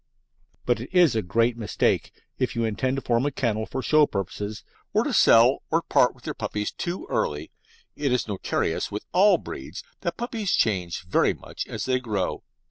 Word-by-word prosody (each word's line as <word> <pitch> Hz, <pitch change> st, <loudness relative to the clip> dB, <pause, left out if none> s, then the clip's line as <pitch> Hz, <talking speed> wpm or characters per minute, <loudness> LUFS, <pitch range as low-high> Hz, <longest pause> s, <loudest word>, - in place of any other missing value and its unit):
But 120 Hz, -2 st, +1 dB
it 120 Hz, -, -7 dB
is 175 Hz, -9 st, +5 dB
a 110 Hz, -, +2 dB
great 115 Hz, +6 st, +1 dB
mistake, 110 Hz, -3 st, 0 dB, 0.3 s
if 130 Hz, -2 st, -1 dB
you 115 Hz, -1 st, 0 dB
intend 130 Hz, +5 st, -1 dB
to 135 Hz, -, -4 dB
form 120 Hz, 0 st, +1 dB
a -, -, -1 dB
kennel 110 Hz, -5 st, -1 dB
for 130 Hz, -, -4 dB
show 155 Hz, -1 st, +5 dB
purposes, 100 Hz, +2 st, -4 dB, 0.3 s
to -, -, +2 dB
sell 120 Hz, +4 st, +6 dB
or 165 Hz, +1 st, +1 dB
part 125 Hz, -, +3 dB
with 125 Hz, -, -20 dB
your -, -, -3 dB
puppies 105 Hz, -1 st, -3 dB
too 175 Hz, +2 st, -4 dB
early. 75 Hz, +1 st, -2 dB, 0.4 s
It 140 Hz, -3 st, -1 dB
is 125 Hz, -2 st, +1 dB
notorious 100 Hz, -3 st, -2 dB
with -, -, -5 dB
all -, -, +5 dB
breeds 65 Hz, -, -8 dB, 0.2 s
that 170 Hz, 0 st, -3 dB
puppies 230 Hz, -5 st, -2 dB
change 90 Hz, -6 st, 0 dB
very 90 Hz, -, +2 dB
much -, -, -7 dB
as -, -, -4 dB
they 130 Hz, -1 st, +1 dB
grow. 105 Hz, -7 st, -2 dB
120 Hz, 185 wpm, -25 LUFS, 105-135 Hz, 0.4 s, sell